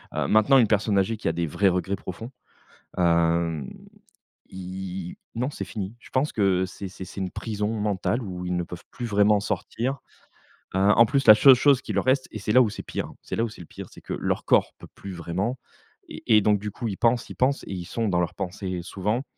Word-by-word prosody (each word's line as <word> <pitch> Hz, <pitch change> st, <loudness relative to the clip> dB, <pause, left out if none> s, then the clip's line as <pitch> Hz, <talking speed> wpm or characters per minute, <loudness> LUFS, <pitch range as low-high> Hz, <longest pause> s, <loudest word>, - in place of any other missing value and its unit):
heu. -, -, 0 dB
Maintenant 110 Hz, +6 st, +5 dB
une 115 Hz, -, +4 dB
personne 105 Hz, 0 st, +1 dB
âgée 100 Hz, +4 st, +1 dB
qui -, -, -4 dB
a 80 Hz, -, +1 dB
des 85 Hz, 0 st, -1 dB
vrais 100 Hz, +6 st, +1 dB
regrets 95 Hz, +2 st, 0 dB
profonds, 110 Hz, +7 st, -8 dB, 0.7 s
hem, 85 Hz, -4 st, +1 dB, 0.8 s
ils 95 Hz, -1 st, -6 dB, 0.2 s
non 125 Hz, +5 st, -1 dB
c'est -, -, -5 dB
fini. 105 Hz, -1 st, -6 dB
Je -, -, -16 dB
pense 135 Hz, +3 st, 0 dB
que 95 Hz, -3 st, +2 dB
c'est 95 Hz, +1 st, -8 dB
c'est 95 Hz, 0 st, -9 dB
c'est 95 Hz, -, -7 dB
une 95 Hz, -, -2 dB
prison 105 Hz, -2 st, -3 dB
mentale 105 Hz, +3 st, -1 dB
où 90 Hz, -3 st, -6 dB
ils 90 Hz, -, -1 dB
ne 90 Hz, -, -1 dB
peuvent 85 Hz, 0 st, -9 dB
plus 120 Hz, -, -6 dB
vraiment 105 Hz, -1 st, +3 dB
sortir, 125 Hz, +5 st, -3 dB, 0.8 s
heu, -, -, +2 dB
en 105 Hz, +4 st, +6 dB
plus 135 Hz, +2 st, 0 dB
la 110 Hz, -, +11 dB
seule 130 Hz, +5 st, +8 dB
chose 135 Hz, +1 st, +4 dB
qui 105 Hz, -, -4 dB
leur 100 Hz, -, 0 dB
reste, 130 Hz, +1 st, +2 dB
et 110 Hz, -, -6 dB
c'est 105 Hz, -, -2 dB
là 125 Hz, -, +7 dB
où 110 Hz, -, 0 dB
c'est -, -, -6 dB
pire -, -, -5 dB
c'est -, -, -5 dB
là 115 Hz, -, +1 dB
où 115 Hz, -, -1 dB
c'est 105 Hz, -, -12 dB
le 85 Hz, -, -11 dB
pire, -, -, -9 dB
c'est -, -, -14 dB
que -, -, -6 dB
leur -, -, -2 dB
corps -, -, +3 dB
peut -, -, -11 dB
plus 100 Hz, -, -8 dB
vraiment, 95 Hz, +9 st, -3 dB, 0.5 s
et 110 Hz, -, +2 dB
et -, -, +5 dB
donc 105 Hz, 0 st, +3 dB
du 105 Hz, +1 st, -5 dB
coup 115 Hz, -, -5 dB
ils 100 Hz, -3 st, -4 dB
pensent, 120 Hz, +1 st, +1 dB
ils -, -, -8 dB
pensent 135 Hz, +2 st, +1 dB
et -, -, -5 dB
ils 90 Hz, -2 st, -5 dB
sont 115 Hz, +5 st, -2 dB
dans 90 Hz, -2 st, +1 dB
leurs 85 Hz, -, -1 dB
pensées 95 Hz, 0 st, -4 dB
souvent 105 Hz, +7 st, -2 dB
100 Hz, 235 wpm, -25 LUFS, 90-115 Hz, 0.8 s, la